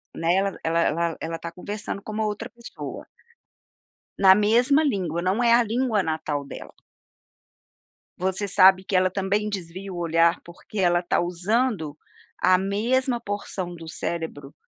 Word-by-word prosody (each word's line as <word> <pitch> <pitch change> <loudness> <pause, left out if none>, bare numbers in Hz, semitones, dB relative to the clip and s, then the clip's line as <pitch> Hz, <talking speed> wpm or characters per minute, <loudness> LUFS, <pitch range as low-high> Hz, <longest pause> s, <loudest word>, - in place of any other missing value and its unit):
Né, 165 +2 +1
ela 195 0 0
ela 165 0 0
ela 165 +1 -4
está 170 - -7
conversando 200 +3 -6
com 215 - -8
uma 215 +1 -1
outra 210 +2 -3
pessoa. 235 -1 -9 1.1
Na 190 -1 +7
mesma 240 +8 +3
língua, 185 - -1
não 185 +6 0
é 235 -1 +5
a 240 +1 +5
língua 230 -2 0
natal 155 -3 -2
dela. - - -10 1.4
Você 190 +2 -1
sabe 190 -1 +6
que 190 - -3
ela 185 0 +4
também 200 +3 -1
desvia 190 0 -6
o 180 - -6
olhar 170 0 +2
porque 175 +4 -9
ela 175 -2 +3
tá 175 - 0
usando, 180 - -1 0.4
a 185 0 +5
mesma 235 +6 0
porção 200 -4 -4
do 165 -1 -10
cérebro 160 -5 -5
190 Hz, 145 wpm, -24 LUFS, 170-210 Hz, 1.4 s, Na